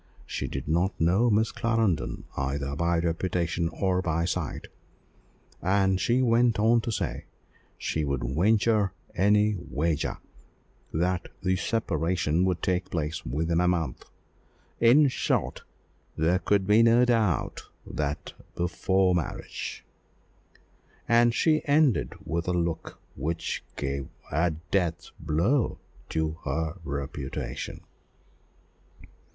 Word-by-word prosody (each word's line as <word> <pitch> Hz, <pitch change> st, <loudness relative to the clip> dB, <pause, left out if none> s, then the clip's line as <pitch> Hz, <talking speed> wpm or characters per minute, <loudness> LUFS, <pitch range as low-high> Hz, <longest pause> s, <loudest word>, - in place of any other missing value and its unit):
She -, -, -3 dB
did -, -, -5 dB
not 85 Hz, +5 st, +1 dB
know 95 Hz, +9 st, +3 dB
Miss 110 Hz, +1 st, +2 dB
Clarendon 115 Hz, -7 st, 0 dB
either 70 Hz, +1 st, -2 dB
by 85 Hz, +2 st, +1 dB
reputation 85 Hz, 0 st, 0 dB
or 90 Hz, +2 st, 0 dB
by 85 Hz, -1 st, 0 dB
sight; 90 Hz, -3 st, -3 dB, 0.9 s
and 95 Hz, 0 st, +2 dB
she 125 Hz, +2 st, +2 dB
went 120 Hz, -1 st, +3 dB
on 115 Hz, +2 st, +4 dB
to 115 Hz, -, -3 dB
say, -, -, -3 dB, 0.5 s
she 80 Hz, -, -2 dB
would 70 Hz, -3 st, -1 dB
"venture 100 Hz, -, +2 dB, 0.2 s
any 105 Hz, +3 st, +3 dB
wager 80 Hz, 0 st, -1 dB, 0.7 s
that 90 Hz, +2 st, 0 dB, 0.2 s
the 95 Hz, 0 st, +2 dB
separation 85 Hz, -4 st, 0 dB
would 90 Hz, -2 st, -1 dB
take 90 Hz, 0 st, 0 dB
place 80 Hz, -2 st, -3 dB
within 80 Hz, +6 st, 0 dB
a 90 Hz, -, +3 dB
month. 85 Hz, -3 st, -1 dB, 0.7 s
In 130 Hz, +6 st, +6 dB
short, 130 Hz, -, -1 dB, 0.6 s
there 85 Hz, +4 st, +2 dB
could 100 Hz, -1 st, +1 dB
be 105 Hz, +3 st, +5 dB
no 115 Hz, +2 st, +5 dB
doubt 110 Hz, -, 0 dB, 0.2 s
that 75 Hz, -1 st, -3 dB, 0.2 s
before 95 Hz, +2 st, +1 dB
marriage," 85 Hz, -4 st, -4 dB, 1.2 s
and 120 Hz, 0 st, +5 dB
she 155 Hz, +6 st, +2 dB
ended 145 Hz, -3 st, +3 dB
with 85 Hz, +1 st, -2 dB
a 90 Hz, -, +1 dB
look 85 Hz, -2 st, -2 dB, 0.2 s
which 80 Hz, +5 st, -3 dB
gave 70 Hz, -1 st, -3 dB, 0.2 s
a 80 Hz, +4 st, +2 dB
death 85 Hz, +2 st, -2 dB
blow 85 Hz, -, +1 dB, 0.3 s
to 80 Hz, 0 st, -1 dB
the 80 Hz, +4 st, -1 dB
reputation. 70 Hz, -2 st, -5 dB
90 Hz, 115 wpm, -27 LUFS, 80-105 Hz, 1.2 s, In